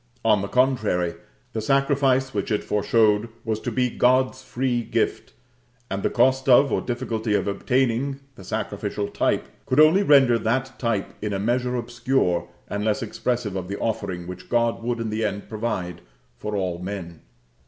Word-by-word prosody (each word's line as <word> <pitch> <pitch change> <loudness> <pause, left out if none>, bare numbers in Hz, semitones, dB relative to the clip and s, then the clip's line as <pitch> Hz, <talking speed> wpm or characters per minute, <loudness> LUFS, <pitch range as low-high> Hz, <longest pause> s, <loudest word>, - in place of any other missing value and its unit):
On 105 -3 +4
the 100 - -3
contrary, 110 -9 +1 0.4
the 110 - -2
sacrifice 135 0 +2
which - - -2
it 105 - 0
foreshowed 105 +1 +2 0.2
was 110 -1 -1
to 120 - -4
be 125 +2 +1
God's 130 +1 +2
free 125 -1 -1
gift; - - -2 0.6
and 100 0 -2
the - - +1
cost 130 +1 +2
of, 135 +2 +6
or - - +1
difficulty 115 -3 -2
of - - 0
obtaining, 130 +6 0
the 95 - -13
sacrificial 105 0 -3
type, - - 0 0.2
could 130 - +2
only 155 +6 +7
render 135 -9 +5
that 125 +4 -1
type 115 -5 -1
in 105 -1 -2
a 95 - -1
measure 125 +4 0
obscure, 120 -6 0 0.2
and 100 0 -3
less 110 +4 0
expressive 115 -2 -2
of 95 -2 -4
the 100 +1 -4
offering 90 -5 -3
which 90 0 -9
God 115 -1 +1
would 120 0 -2
in 115 -1 -3
the 110 +1 -1
end 100 -1 -3
provide 105 -5 -3 0.3
for 105 +10 -5
all 90 -3 -2
men. 90 -3 -6
115 Hz, 170 wpm, -24 LUFS, 100-130 Hz, 0.6 s, only